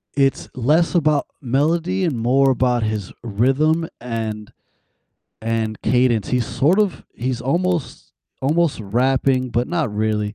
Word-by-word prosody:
It's 135 -1 +1
less 150 +9 +2
about 155 -4 +2
melody, 165 +8 0
and 155 -8 0
more 130 +4 +3
about 125 -2 +1
his 105 -3 -3
rhythm, 135 +9 +1
and 110 -3 -4 0.9
and 110 -1 -2
cadence, 125 -4 +2
he's 125 -2 0
sort 140 - +2
of 205 -4 -1
he's 125 0 -3
almost 170 +4 -2 0.3
almost 155 -1 +1
rapping, 130 +4 +1
but 120 +3 0
not 160 -11 -1
really. 105 0 -1
130 Hz, 130 wpm, -20 LUFS, 115-155 Hz, 0.9 s, more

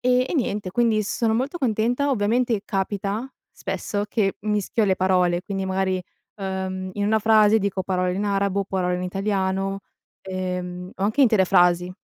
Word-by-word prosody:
E 250 +1 +2
e - - -3
niente 210 - -1
quindi 225 0 +2
sono 220 +2 0
molto 270 +8 -1
contenta, 245 +2 +1
ovviamente 230 -1 +1
capita 200 +4 -2 0.2
spesso, 205 0 -3
che 205 -3 0
mischio 210 +1 0
le 190 - +3
parole, 180 -2 +2
quindi 195 -1 -3
magari, 190 0 0 0.4
uhm, 190 -1 -4
in 205 +1 -2
una 220 +2 +3
frase 215 0 +5
dico 195 -2 -1
parole 185 -1 0
in 200 +2 -2
arabo, 200 -1 0
o - - -2
parole 185 -2 -1
in 180 - -3
italiano, 195 0 -1 0.4
ehm, 180 -1 -4
o - - -6
anche 215 +8 +1
intere 220 -7 +5
frasi. 180 -1 +3
195 Hz, 165 wpm, -23 LUFS, 185-220 Hz, 0.4 s, frase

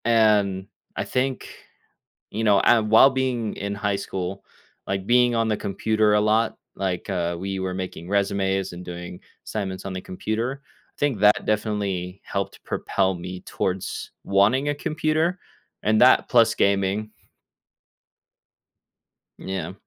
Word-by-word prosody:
And 105 -4 +3 0.3
I - - -1
think, 130 +1 -2 0.8
you 110 +2 -3
know, 105 -3 +5
and 110 -3 +4
while 115 +5 +8
being 130 -4 -1
in 100 0 -4
high 100 -1 -1
school, 95 -1 -4 0.4
like, 95 0 -2
being 120 +1 +4
on 115 -1 +1
the 110 - +1
computer 105 +1 +1
a 105 - +4
lot, 110 +2 +2 0.2
like, 95 0 -3
uh, 85 -2 -1
we 95 +1 -3
were 95 -1 -2
making 90 -2 -6
resumes 95 -2 0
and 90 +1 -8
doing 90 0 -8 0.3
assignments 95 -3 -4
on 95 - -4
the 95 - -4
computer, 115 +9 -3 0.4
think 140 -7 0
that 105 +1 +4
definitely 100 -4 -2
helped 100 0 -4
propel 95 -1 0
me 90 +1 -7
towards 95 0 -3
wanting 110 +9 +3
a 145 - 0
computer 155 +3 0 0.4
and 110 0 +3
that 130 +1 +6
plus 115 -2 +5
gaming. 100 +2 +1 2.3
Yeah. 95 -2 -4
100 Hz, 135 wpm, -24 LUFS, 95-115 Hz, 2.3 s, while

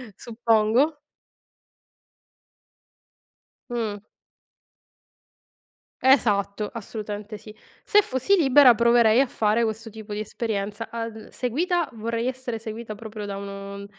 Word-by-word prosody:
suppongo. 230 - +1 2.7
Mh. 225 -4 -2 2.0
Esatto, 210 -6 +2
assolutamente 210 -1 -6
sì. 215 - -12 0.3
Se 415 0 +5
fossi 260 +9 +1
libera 280 -5 +7
proverei 235 0 +5
a 275 - +3
fare 225 -1 +1
questo 225 +1 -4
tipo 215 -1 -10
di 210 - -3
esperienza. 210 0 -4
Al 230 -1 -6
seguita 335 - -1
vorrei 230 +2 -2
essere 255 -3 -4
seguita 220 0 -6
proprio 215 -1 -8
da 200 -1 -5
uno 200 0 -7
225 Hz, 100 wpm, -24 LUFS, 210-245 Hz, 2.7 s, libera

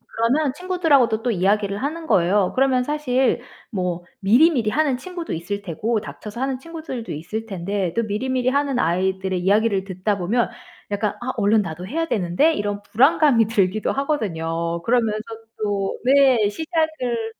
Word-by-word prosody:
그러면 255 +5 +1
친구들하고도 295 -10 +2
또 245 - +1
이야기를 200 +1 +1
하는 320 +4 -3
거예요. 195 - +2
그러면 260 -1 +2
사실 265 -3 0 0.3
뭐 180 -4 -2 0.2
미리미리 240 - +4
하는 285 +1 +1
친구도 345 +4 -6
있을 200 +5 -4
테고 210 +5 -1
닥쳐서 210 +1 -9
하는 265 0 -1
친구들도 315 -6 -7
있을 215 +9 -5
텐데 190 -2 -2
또 230 - +1
미리미리 250 +4 -1
하는 280 -1 0
아이들의 190 0 0
이야기를 200 +1 +2
듣다 195 +2 -2
보면 225 +7 +1 0.4
약간 205 0 0
'아 250 +2 -2
얼른 210 0 +3
나도 175 +1 -6
해야 325 +9 -1
되는데.' 215 - +2
이런 205 -6 -3
불안감이 250 0 +4
들기도 210 -1 +1
하거든요. 170 - -2
그러면서 225 -1 +1 0.4
또 200 -2 -1
네. 260 -5 +5
시작을 300 - -2
225 Hz, 360 characters per minute, -22 LUFS, 195-270 Hz, 0.4 s, 네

